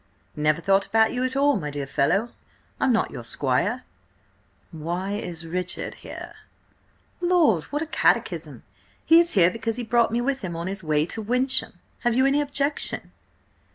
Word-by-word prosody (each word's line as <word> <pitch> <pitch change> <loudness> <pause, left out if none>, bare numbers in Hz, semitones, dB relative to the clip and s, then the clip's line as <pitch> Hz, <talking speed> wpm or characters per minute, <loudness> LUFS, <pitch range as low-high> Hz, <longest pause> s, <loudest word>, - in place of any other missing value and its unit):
"Never 150 +1 +1
thought 195 +2 +2
about 220 0 +3
you 250 0 -1
at 255 0 -1
all, 285 +1 +3
my 150 - -4
dear 145 -1 -4
fellow. 140 - +1 0.5
I'm 265 - +3
not 225 - +1
your - - -7
squire." - - -1 0.9
"Why 175 +4 -4
is 175 -5 -5
Richard 180 +2 -3
here?" - - -9 0.9
"Lord, 335 - +3
what 295 +2 -3
a - - -4
catechism! 320 - 0 0.4
He 330 +1 +7
is 340 0 +2
here 180 -3 +5
because 230 +1 -3
he 245 - -4
brought 235 +1 +2
me 235 - 0
with 270 +2 -1
him 180 -7 -5
on 170 +1 -4
his 190 0 -3
way 155 -1 +1
to 220 - -4
Wyncham. 250 +5 +1 0.3
Have 240 -2 +1
you 260 +1 +4
any 280 +2 +3
objection?" 285 0 -2
225 Hz, 170 wpm, -24 LUFS, 170-265 Hz, 0.9 s, He